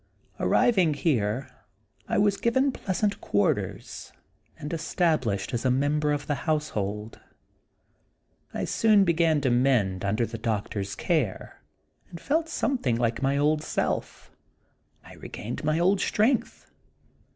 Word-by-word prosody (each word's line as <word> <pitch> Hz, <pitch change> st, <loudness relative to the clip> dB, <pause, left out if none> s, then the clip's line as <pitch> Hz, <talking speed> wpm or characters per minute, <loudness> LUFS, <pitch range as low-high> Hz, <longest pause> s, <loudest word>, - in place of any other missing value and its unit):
Arriving 185 Hz, -10 st, +3 dB
here, 130 Hz, -4 st, -1 dB, 0.6 s
I -, -, 0 dB
was 205 Hz, -1 st, +3 dB
given 260 Hz, +6 st, +1 dB
pleasant 200 Hz, -2 st, -2 dB
quarters, 100 Hz, 0 st, -2 dB, 0.5 s
and 150 Hz, +3 st, -6 dB
established 155 Hz, -, 0 dB
as 120 Hz, -, -1 dB
a 130 Hz, -, +2 dB
member 145 Hz, +3 st, +1 dB
of 145 Hz, -1 st, -2 dB
the 145 Hz, -, -1 dB, 0.2 s
household. 105 Hz, -9 st, -2 dB, 1.3 s
I -, -, -3 dB
soon 215 Hz, -3 st, +4 dB
began 165 Hz, -4 st, +2 dB
to 130 Hz, -2 st, +1 dB
mend 120 Hz, -7 st, +2 dB
under 105 Hz, +4 st, +1 dB
the 115 Hz, 0 st, -7 dB
doctors 100 Hz, -2 st, -3 dB
care, 150 Hz, -, -2 dB, 0.5 s
and 170 Hz, -, -9 dB
felt 320 Hz, -, 0 dB
something 250 Hz, -, 0 dB
like 115 Hz, 0 st, -1 dB
my 135 Hz, +1 st, +1 dB
old 150 Hz, +1 st, +2 dB
self. -, -, -3 dB, 0.7 s
I -, -, -13 dB
regained 115 Hz, +7 st, -7 dB
my 155 Hz, +1 st, +1 dB
old 190 Hz, +3 st, +2 dB
strength. 210 Hz, -, 0 dB
145 Hz, 125 wpm, -26 LUFS, 115-175 Hz, 1.3 s, soon